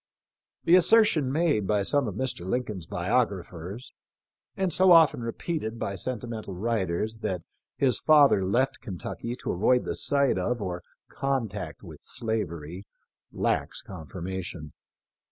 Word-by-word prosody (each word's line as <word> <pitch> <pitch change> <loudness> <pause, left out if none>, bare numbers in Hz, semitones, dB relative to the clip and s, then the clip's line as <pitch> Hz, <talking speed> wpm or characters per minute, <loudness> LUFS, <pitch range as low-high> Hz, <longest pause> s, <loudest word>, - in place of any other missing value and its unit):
The 170 - +3
assertion 180 - +4
made 145 - +1
by 105 -2 +2
some 140 +6 +2
of 100 - -4
Mr. 130 -9 -2
Lincoln's 105 -4 -3
biographers, 95 0 -2 0.6
and 190 -3 0
so 185 +1 +5
often 160 -7 +6
repeated 115 0 -3
by 100 - -3
sentimental 110 -1 -5
writers, 110 0 -1
that 95 -6 -3 0.3
his 130 -6 +2
father 145 -10 +5
left 120 +8 0
Kentucky 115 +4 -5
to - - -4
avoid 125 +7 +2
the - - -2
sight 140 -7 +2
of 120 +6 -1
or 90 -3 -4 0.3
contact 105 - -3
with - - -11
slavery, 95 -5 -4 0.4
lacks - - -1
confirmation. 85 -1 -7
110 Hz, 125 wpm, -27 LUFS, 95-130 Hz, 0.6 s, often